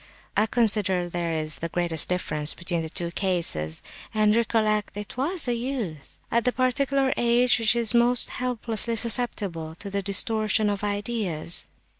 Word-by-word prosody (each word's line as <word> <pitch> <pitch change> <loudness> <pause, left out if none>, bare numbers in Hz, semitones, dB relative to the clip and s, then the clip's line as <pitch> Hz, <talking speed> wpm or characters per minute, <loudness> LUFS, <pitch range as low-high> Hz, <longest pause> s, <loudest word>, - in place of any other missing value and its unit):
I 215 - +2
consider 205 -6 +1
there 175 -1 -3
is 155 -3 -2
the 165 - -4
greatest 170 -2 +2
difference 155 -4 -1
between 170 -1 -2
the 160 - -6
two 170 +1 -2
cases. 170 - -1 0.3
And 215 0 +3
recollect—it 215 -3 -1
was 300 +5 -1
a 245 - +1
youth, 230 - -5
at 235 0 +1
the 250 - +1
particular 265 +1 0
age 240 +1 +3
which 225 +1 +2
is 235 -1 +5
most 240 0 +3
helplessly 235 -2 0
susceptible 205 -9 0
to 200 +3 -9
the 200 0 -2
distortion 215 +2 +1
of 205 0 -5
ideas!" 205 -6 -1
210 Hz, 150 wpm, -25 LUFS, 175-235 Hz, 0.3 s, is